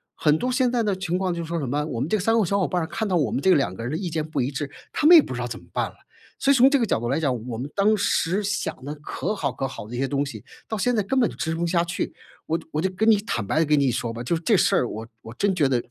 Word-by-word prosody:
很 150 0 +2
多 255 - -1
现 250 -1 +2
在 245 -1 +1
的 205 -3 0
情 185 -1 -2
况 190 -1 0
就 170 -1 -3
说 170 +1 -3
什 140 - -3
么， 145 +4 -1
我 125 -7 -4
们 135 +6 -2
这 215 - +2
3 215 +3 +1
个 - - +3
小 200 +2 0
伙 185 - +1
伴 180 - -1
儿 160 - -3
看 220 +4 -3
到 190 - 0
我 145 -9 +2
们 - - -1
这 190 - +6
2 115 - +1
个 115 - -7
人 120 - -3
的 155 - -1
意 185 -3 -3
见 155 -1 -2
不 150 -3 -1
一 125 - 0
致， 140 0 -4 0.2
他 - - -1
们 345 +3 +10
也 325 - +10
不 130 - -6
知 - - -5
道 125 - -2
怎 115 -4 -6
么 85 - -20
办 - - 0
了。 - - -15 0.4
所 275 - +3
以 - - +5
从 260 +1 +7
这 280 - +3
个 240 - +1
角 195 - 0
度 120 +1 -3
来 135 - +1
讲， 125 -6 -1
我 115 -3 -4
们 130 +4 -4
当 210 +2 +3
时 195 0 +1
想 200 -9 -3
得 145 - -4
可 155 +6 -4
好 210 - -2
可 135 - -3
好 105 -5 -8
的 120 - -7
一 - - -4
些 135 +2 0
东 140 0 0
西， 140 - -8 0.2
到 220 - -3
现 245 +5 +1
在 215 - +2
根 260 +7 0
本 240 - +4
就 - - -8
执 160 - -3
行 165 0 -2
不 - - +1
下 170 0 +2
去。 175 +1 -3 0.3
我 165 - 0
就 170 - -12
我 155 - -1
就 190 - +1
跟 220 +4 +3
你 215 - +5
坦 120 - -2
白 150 - 0
地 165 - +3
跟 150 0 +3
你 140 -3 +3
说 115 0 -2
吧， 115 +1 -6
就 125 - -1
是 165 - -1
这 215 +5 +3
事 - - +3
儿 125 - +2
我 110 0 -6 0.2
我 110 - -10
真 200 +10 +1
觉 155 -6 +2
得， 125 -3 0
165 Hz, 375 characters per minute, -24 LUFS, 135-200 Hz, 0.4 s, 们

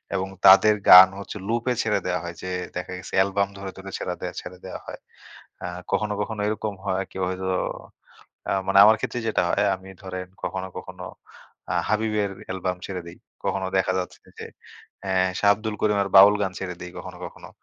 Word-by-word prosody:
এবং 95 0 -1 0.2
তাদের 105 +3 +8
গান 90 +1 +12
হচ্ছে 100 +1 -7
লুপে 120 +3 0
ছেড়ে 105 -3 +1
দেয়া 90 0 0
হয় 85 0 -6
যে, 95 - -5 0.3
দেখা 90 +1 -5
গেছে 95 - -10
অ্যালবাম 100 +1 +2
ধরে, 100 0 -6
ধরে 95 0 -9
ছেড়ে 90 -1 -4
দেয়া, - - -4
ছেড়ে 90 0 -10
দেওয়া 95 - -7
হয়। - - -8 0.6
অ্যা - - -5 0.2
কখনো, 105 -1 0
কখনো 110 0 -4
এরকম 105 -1 -2
হয় 95 0 0
কি - - -9
হয়তো 95 0 -3 1.0
অ্যা - - -1
মানে 95 - +2
আমার 110 +1 +7
ক্ষেত্রে 120 - -3
যেটা 110 - +1
হয় - - +1
আমি 95 +1 -14
ধরেন 95 -1 -6 0.2
কখনো, 95 0 -3
কখনো 90 -1 -8 0.7
আ - - 0 0.2
হাবিবের 105 -2 0 0.2
অ্যালবাম 95 -1 -3
ছেড়ে 90 -2 -5
দেই। 85 - -11 0.3
কখনো 95 -1 -1
দেখা 95 0 +1
যাচ্ছে 90 - -6 0.2
যে, - - -7 0.6
অ্যা 95 -1 -2 0.3
শাহ 100 - +4
আব্দুল 110 0 -5
করিমের 100 -2 +1
বাউল 100 +2 +9
গান 95 -2 0
ছেড়ে 90 -2 -5
দেই 90 - -7
কখনো, 90 -1 -8
কখনো। 85 - -11
95 Hz, 185 wpm, -24 LUFS, 95-105 Hz, 1.0 s, গান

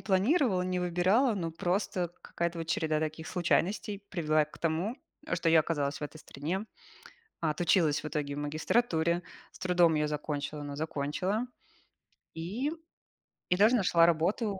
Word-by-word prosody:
планировала, 200 - +2
не 180 0 -1
выбирала, 185 +8 +3
но 170 -4 -2
просто 175 +1 -1
какая-то 170 0 -3
вот 165 - -4
череда 160 -1 0
таких 155 0 -4
случайностей 195 +3 0
привела 155 -5 +2
к 150 - -16
тому, 170 +8 -1 0.4
что 165 - 0
я 160 0 +6
оказалась 145 -2 -1
в - - -8
этой 150 +1 -5
стране. 165 +9 -4 0.8
Отучилась 160 -1 +2
в - - -2
итоге 145 -2 -3
в - - -4
магистратуре, 160 +3 +1 0.3
с - - -16
трудом 175 -3 +3
её 150 0 +1
закончила, 150 0 -3
но 145 -1 -6
закончила. 160 - -1 0.9
И, 205 - -2 0.8
и 180 - +4
даже 215 +5 +5
нашла 170 -5 +4
работу. 190 +5 +1
170 Hz, 145 wpm, -30 LUFS, 155-190 Hz, 0.9 s, я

